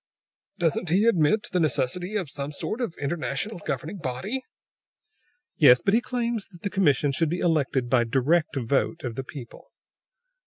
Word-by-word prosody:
"Doesn't 170 0 0
he 190 +6 +3
admit 205 -1 +3
the 180 - +1
necessity 160 +5 0
of 195 -6 -1
some 140 +1 -4
sort 215 - -3
of 225 -9 -3
an - - -7
international 170 +6 -2
governing 165 +3 -4
body?" 180 - -3 1.2
"Yes; 125 -5 +7
but 195 - +3
he 230 - +4
claims 235 -4 -2
that 175 -4 -17
the 200 - -2
commission 145 -7 +2
should 160 +3 0
be 175 - -1
elected 140 -7 +1
by 120 -1 +3
direct 140 +8 +1
vote 135 +6 0
of 120 -3 -3
the 135 - -4
people!" 130 -3 -11
160 Hz, 165 wpm, -26 LUFS, 135-195 Hz, 1.2 s, Yes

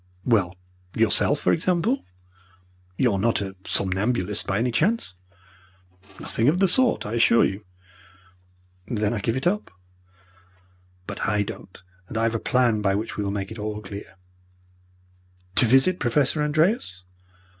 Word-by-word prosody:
"Well, 95 -7 +2 0.4
yourself, 115 +6 +3
for - - +2
example. 185 - 0 0.9
You 125 -5 +2
are 95 - -1
not 115 +3 +1
a 95 -1 -5
somnambulist, 95 +1 0
by 95 - 0
any 120 +3 0
chance?" 165 - 0 1.1
"Nothing 115 - -1
of 155 +5 +4
the 195 +1 +4
sort, 245 +7 +3
I 105 - -5
assure 115 0 +4
you." 95 +2 -4 1.2
"Then 105 -3 -1
I 115 - -2
give 115 +3 -1
it 130 - -4
up." 205 +4 0 1.4
"But 100 0 -4
I 105 0 +1
don't 95 - -9 0.3
and 110 - -6
I 115 - +1
have 115 0 +1
a 115 - -1
plan 120 -4 +1
by 95 -1 +1
which 110 +3 -3
we 105 - -2
will 100 - -2
make 100 0 -4
it 110 - -8
all 105 0 -4
clear." 100 -1 -9 1.4
"To - - +5
visit 135 +10 +4
Professor 135 +5 +1
Andreas?" 150 - 0
115 Hz, 150 wpm, -24 LUFS, 100-145 Hz, 1.4 s, To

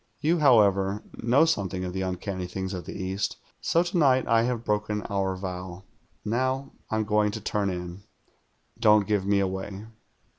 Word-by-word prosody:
You, 165 +3 +2
however, 105 -7 +4 0.2
know 125 +7 +4
something 95 - -1
of 90 - -5
the 95 - -2
uncanny 95 0 -3
things 95 +1 -4
of 90 -2 -5
the - - -7
East, 95 +2 -2 0.2
so 170 - +2
to 175 +1 -2
night 130 -4 +4
I 115 -1 +4
have 120 -1 -1
broken 105 0 -1
our 95 -1 0
vow. 90 -1 -6 0.4
Now 130 +5 -1 0.2
I'm 110 0 0
going 105 0 +2
to 110 - -4
turn 105 -1 -1
in. 90 +1 -5 0.8
Don't 105 -2 +5
give 100 -2 0
me 100 0 +3
away." 95 +1 -3
100 Hz, 170 wpm, -26 LUFS, 95-115 Hz, 0.8 s, Don't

